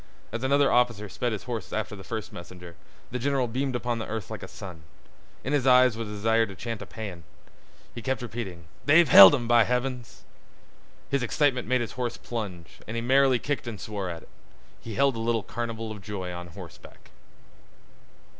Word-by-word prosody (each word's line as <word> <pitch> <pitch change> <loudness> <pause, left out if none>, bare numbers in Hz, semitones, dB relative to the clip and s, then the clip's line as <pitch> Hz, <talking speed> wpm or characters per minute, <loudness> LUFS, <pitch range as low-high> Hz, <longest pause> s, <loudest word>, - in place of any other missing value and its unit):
As 115 - -4
another 140 +2 +3
officer 120 -4 +2
sped 120 +5 -2
his 110 - -4
horse 120 -3 -5
after 110 -1 -3
the 95 - -10
first 110 -2 -5
messenger, 85 0 -10 0.4
the 125 - -3
general 135 0 +1
beamed 130 +3 -2
upon 120 -1 -2
the 110 - -5
earth 110 -4 -5
like - - -6
a - - -7
sun. 90 -5 -10 0.6
In 135 - -2
his 135 -3 +2
eyes 125 -2 +6
was 115 -1 -5
a - - -7
desire 110 +2 +2
to 100 - -9
chant 115 +3 -5
a - - -8
paean. 100 -6 -7 0.7
He 120 - -7
kept 130 +1 -2
repeating, 105 -8 -6 0.2
"They've 155 +3 +6
held 100 0 +11
'em, 120 -4 -3
by 120 -1 +6
heavens!" 125 -1 -3 0.9
His 140 -1 +1
excitement 130 0 +1
made 130 0 +2
his 120 - -3
horse 125 -2 -3
plunge, 100 -8 -6
and 115 - -5
he - - -1
merrily 130 +1 +4
kicked 145 0 -3
and 110 -4 -5
swore 100 -2 -4
at 85 -1 -7
it. - - -20 0.5
He 115 -2 -8
held 140 -1 +3
a - - -4
little 115 -1 0
carnival 115 -1 -5
of 105 -2 -8
joy 95 -3 -5
on 90 0 -7
horseback. 85 -2 -13
115 Hz, 195 wpm, -27 LUFS, 105-125 Hz, 0.9 s, held